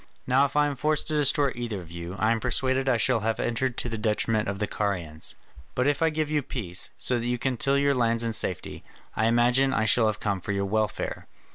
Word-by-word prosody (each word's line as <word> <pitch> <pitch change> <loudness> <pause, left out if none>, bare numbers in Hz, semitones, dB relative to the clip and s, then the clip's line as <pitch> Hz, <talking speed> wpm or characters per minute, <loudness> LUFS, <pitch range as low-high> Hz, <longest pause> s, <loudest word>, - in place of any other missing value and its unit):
Now 130 +2 +4
if 140 - -5
I 150 0 +4
am 145 -1 -2
forced 155 +3 0
to - - -1
destroy 145 -1 +3
either 115 -4 -4
of 85 -2 -11
you, 85 +2 -6
I 110 +2 +2
am 115 - +1
persuaded 130 +2 0
I 125 - +3
shall 120 +1 +2
have 110 +1 -1
entered 125 +1 -1
to - - -2
the 115 -2 -4
detriment 110 0 0
of 100 - -3
the 105 - -1
Carians. 90 -7 -2 0.4
But 125 - +1
if 145 +2 +1
I 165 - +4
give 155 -1 -1
you 150 0 0
peace, 100 -9 -4
so 125 -1 0
that 115 - -3
you 125 0 0
can 130 +1 -1
till 135 +4 +2
your 140 0 +3
lands 115 -2 +1
in 115 -1 -1
safety, 90 -5 -1 0.3
I 110 - +2
imagine 120 +3 +3
I 110 - +1
shall 115 0 +4
have 105 -1 -1
come 100 -3 -2
for 100 - -3
your 100 0 -1
welfare. 110 +1 -2
120 Hz, 245 wpm, -26 LUFS, 105-135 Hz, 0.4 s, Now